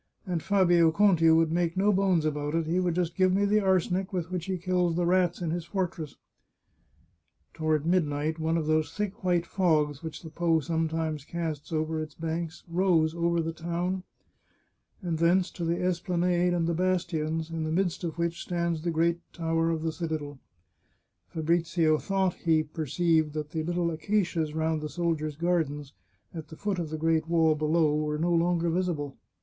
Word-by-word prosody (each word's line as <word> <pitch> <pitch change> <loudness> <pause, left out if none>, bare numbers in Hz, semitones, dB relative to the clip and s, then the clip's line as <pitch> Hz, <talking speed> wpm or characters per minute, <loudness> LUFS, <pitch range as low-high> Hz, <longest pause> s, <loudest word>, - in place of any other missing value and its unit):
And 175 -4 -2
Fabio 175 -4 +4
Conti 175 -3 +4
would 160 0 +4
make 170 +1 0
no 205 +2 +3
bones 185 -4 +2
about 150 0 -1
it; 165 -1 +1
he 170 +3 0
would 175 -2 0
just 175 -2 -1
give 185 -1 +3
me 200 +2 +2
the 210 +1 +3
arsenic 190 -1 +1
with 180 -2 -3
which 180 -2 -3
he 190 -1 -2
kills 180 -1 0
the 175 0 +1
rats 175 0 +2
in 165 - -1
his 170 -1 -3
fortress," 170 -6 -3 1.4
Toward 155 -2 0
midnight 160 -3 0
one 160 +1 0
of 160 - -1
those 155 0 +1
thick 205 -2 -4
white 175 -2 +2
fogs 155 -7 +1
which 160 +1 -7
the 160 - -9
Po 165 0 +2
sometimes 160 -1 -2
casts 155 -2 -5
over 155 0 -1
its 155 -1 -7
banks 165 0 -4
rose 170 -2 +2
over 170 0 +1
the 165 0 -3
town, 175 +3 -2 1.0
and 165 -3 -2
thence 175 +2 +3
to 175 - -6
the 170 +1 0
esplanade 180 0 +1
and 175 -1 +1
the 170 - 0
bastions, 165 -3 -1
in 165 -1 -3
the 155 - -2
midst 180 +1 0
of 165 -1 -4
which 170 0 -2
stands 170 -2 -2
the 170 - -2
great 170 +1 +1
tower 165 -1 0
of 160 -1 -1
the 165 - 0
citadel. 155 -4 -4 0.9
Fabrizio 165 -1 +1
thought 190 -2 0
he 160 -2 +1
perceived 155 0 0
that 150 -1 -4
the 160 - -2
little 175 +1 -1
acacias 165 -2 -1
round 160 -1 0
the 150 - -4
sol 170 0 0
diers' 155 -1 -5
gardens, 155 -5 -1 0.4
at 160 -2 -7
the 160 - -11
foot 200 -3 -2
of 165 -3 -3
the 155 - -4
great 160 0 +1
wall 165 -2 +3
below, 155 0 +2
were 150 0 -1
no 170 +3 +1
longer 170 0 +2
visible. 160 -6 -2
165 Hz, 185 wpm, -28 LUFS, 155-175 Hz, 1.4 s, Fabio